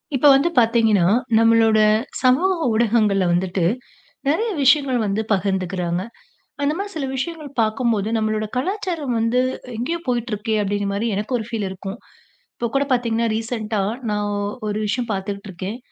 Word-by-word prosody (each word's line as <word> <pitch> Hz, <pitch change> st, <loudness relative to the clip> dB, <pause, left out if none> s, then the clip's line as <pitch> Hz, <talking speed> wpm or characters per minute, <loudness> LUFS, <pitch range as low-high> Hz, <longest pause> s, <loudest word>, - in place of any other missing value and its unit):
இப்போ 280 Hz, +3 st, +4 dB
வந்து 280 Hz, +6 st, +3 dB
பாத்தீங்கன்னா, 225 Hz, -5 st, +4 dB, 0.3 s
நம்மளோட 225 Hz, -1 st, +4 dB, 0.4 s
சமூக 265 Hz, +10 st, +4 dB, 0.2 s
ஊடகங்கள்ல 215 Hz, -4 st, +2 dB
வந்துட்டு 180 Hz, 0 st, 0 dB, 0.6 s
நெறையா 430 Hz, +11 st, +1 dB
விஷயங்கள் 270 Hz, -2 st, +4 dB
வந்து 205 Hz, +1 st, 0 dB
பகிர்ந்துக்குறாங்க. 185 Hz, -3 st, 0 dB, 0.6 s
அந்த 285 Hz, +1 st, +2 dB
மாதிரி 400 Hz, +2 st, -4 dB
சில 280 Hz, -3 st, -2 dB
விஷயங்கள் 310 Hz, +2 st, -4 dB
பாக்கும் 225 Hz, +2 st, +1 dB
போது, 205 Hz, 0 st, -1 dB
நம்மளோட 215 Hz, -1 st, 0 dB
கலாச்சாரம் 325 Hz, -, -2 dB
வந்து 230 Hz, +2 st, +2 dB, 0.4 s
எங்கயோ 265 Hz, +10 st, -2 dB
போயிட்டு 240 Hz, -1 st, -1 dB
இருக்கே 210 Hz, +2 st, -2 dB
அப்டிங்குற 205 Hz, 0 st, -1 dB
மாதிரி 225 Hz, +3 st, -1 dB
எனக்கு 210 Hz, +5 st, -3 dB
ஒரு 220 Hz, -, -4 dB
ஃபீல் 225 Hz, -4 st, -2 dB
இருக்கும். 195 Hz, +3 st, -7 dB, 0.6 s
இப்போ 235 Hz, -, -3 dB
கூடப் 275 Hz, 0 st, +1 dB
பாத்தீங்கன்னா 235 Hz, -2 st, +1 dB
ரீசன்ட்டா, 225 Hz, -2 st, -2 dB, 0.3 s
நான் 210 Hz, 0 st, -1 dB, 0.4 s
ஒரு 205 Hz, -, -2 dB
விஷயம் 240 Hz, +3 st, -1 dB
பாத்துக்கிட்டு 200 Hz, +1 st, -4 dB
இருக்கேன். 190 Hz, +5 st, -6 dB
225 Hz, 145 wpm, -21 LUFS, 205-255 Hz, 0.6 s, இப்போ